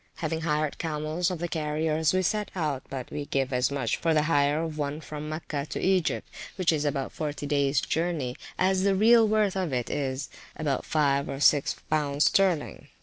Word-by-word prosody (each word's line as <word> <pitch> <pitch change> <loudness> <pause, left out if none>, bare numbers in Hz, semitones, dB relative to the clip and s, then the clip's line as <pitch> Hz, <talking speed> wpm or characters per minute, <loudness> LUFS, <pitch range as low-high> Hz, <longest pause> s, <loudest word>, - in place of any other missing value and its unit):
Having 160 0 -3
hired 150 -2 -1
camels 155 +2 -1
of 180 - -3
the 175 +2 -3
carriers, 155 0 0
we 185 0 +1
set 210 +3 0
out, 150 -7 -1
but 130 -2 -6
we 145 - -4
give 135 -1 -1
as 125 0 +2
much 135 -5 -1
for 165 -1 +1
the 150 - +3
hire 150 0 +2
of 155 -2 -5
one 145 +1 -2
from 150 0 -7
Mecca 155 -2 -4
to - - -3
Egypt, 185 -2 +1 0.3
which 185 -3 +2
is 150 -2 0
about 140 -2 -1
forty 150 -2 -4
days 140 -1 +2
journey, 160 -7 -1 0.2
as 185 0 +2
the 195 0 +3
real 225 +3 +6
worth 210 -2 +2
of 185 -5 -1
it 125 -2 -2
is, 140 -1 -2
(viz.) - - -17 0.2
about 145 -4 -2
five 140 -2 +1
or 135 - -4
six 145 -1 +4 0.2
pounds 145 -1 +2
sterling. 185 -6 +1
155 Hz, 200 wpm, -27 LUFS, 140-170 Hz, 0.3 s, real